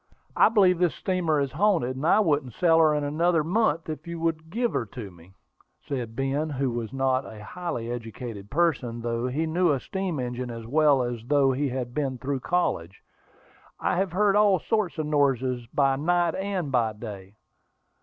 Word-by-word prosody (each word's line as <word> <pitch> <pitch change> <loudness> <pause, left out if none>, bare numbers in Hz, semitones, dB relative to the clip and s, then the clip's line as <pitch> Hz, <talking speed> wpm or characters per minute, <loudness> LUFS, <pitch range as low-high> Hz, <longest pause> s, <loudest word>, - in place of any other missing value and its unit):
"I - - +6
believe 190 -6 +4
this 175 -2 +2
steamer 175 -5 0
is 140 -2 -1
haunted, 165 -6 +1
and 140 +5 -2
I 210 - +5
wouldn't 145 - 0
sail 165 -2 +4
in 155 -2 +3
her - - -1
another 165 +2 +2
month 165 -2 +1
if 155 0 -6
you 170 0 -5
would 160 -1 -2
give 235 +6 -1
her 115 - -1
to 105 -3 -8
me," 85 +2 -18 0.5
said 120 -5 -4
Ben, 135 +4 -1
who 135 -3 -1
was 115 -2 -4
not 135 -1 +1
a 105 -4 -10
highly 120 -5 -5
educated 115 -3 -7
person, 130 -6 0
though 120 +1 -1
he 145 +6 -1
knew 175 +2 +2
a 140 - +1
steam 190 -1 -3
engine 125 0 -4
as 115 -1 -7
well 145 +1 +3
as 120 -2 -4
though 140 -1 +4
he 140 +2 -1
had 125 -1 -4
been 135 -2 -2
through 135 +2 -3
college. 110 - -1 0.8
"I - - 0
have 190 -1 0
heard 205 +1 +3
all 205 -2 +5
sorts 210 -1 -1
of 155 - -1
noises 130 -5 +1
by 135 +1 +1
night 170 +2 +1
and 190 -6 -3
by 115 -4 +1
day." 105 -3 -9
140 Hz, 190 wpm, -26 LUFS, 120-170 Hz, 0.8 s, I